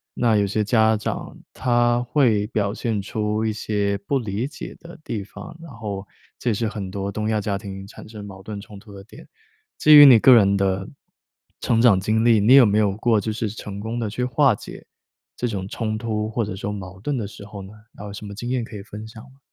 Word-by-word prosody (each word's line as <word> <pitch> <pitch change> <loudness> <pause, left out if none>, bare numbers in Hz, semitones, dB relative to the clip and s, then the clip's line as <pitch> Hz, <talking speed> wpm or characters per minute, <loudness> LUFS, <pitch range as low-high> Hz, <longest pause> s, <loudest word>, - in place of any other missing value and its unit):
那 115 -3 +2
有 100 -1 +2
些 105 +2 0
家 110 0 +3
长 105 - -5 0.2
他 120 -1 +2
会 120 -5 +2
表 105 -3 -1
现 115 -2 -2
出 105 +1 -2
一 110 - 0
些 100 -1 -1
不 140 - +1
理 110 0 -3
解 150 0 -9
的 170 +1 -12
地 105 -8 -4
方， 100 +7 -11
然 165 -3 -11
后 105 -4 -6 0.3
这 125 - -1
也 - - +2
是 115 +2 -1
很 105 -3 -5
多 100 +1 -4
东 105 +1 -3
亚 110 -1 +1
家 105 -1 -2
庭 95 -1 -7
产 100 - -13
生 105 -2 -9
矛 95 -1 -11
盾 105 +1 -7
冲 100 0 -12
突 105 +1 -16
的 100 -1 -11
点。 105 - -15 0.5
基 155 0 +7
于 145 -1 +11
你 125 -4 +9
个 130 +4 +7
人 100 -4 +5
的 95 +1 -1 0.7
成 115 - +1
长 115 -5 +5
经 110 +4 0
历， 115 -2 +5
你 110 +6 +6
有 135 -3 +8
没 105 0 +2
有 100 -2 +1
过 110 -1 +2
就 110 - -3
是 110 +1 -3
成 100 -1 -8
功 110 +3 -4
地 110 -3 -2
去 120 +4 -3
化 125 0 +3
解 - - -11 0.5
这 120 - -1
种 100 -5 -4
冲 110 0 -3
突 110 -1 -3
或 115 +1 -1
者 105 - -5
说 100 +1 -5
矛 95 -2 -8
盾 140 +7 -2
的 115 - -3
时 100 - -11
候 105 -1 -9
呢？ 95 - -10 0.2
然 - - -20
后 - - -7
有 100 - -8
什 105 - -8
么 100 0 -8
经 120 +3 -6
验 130 -1 0
可 115 - -10
以 100 - -7
分 105 +1 -9
享 110 0 -12
吗？ 135 +1 -19
110 Hz, 260 characters per minute, -22 LUFS, 100-115 Hz, 0.7 s, 于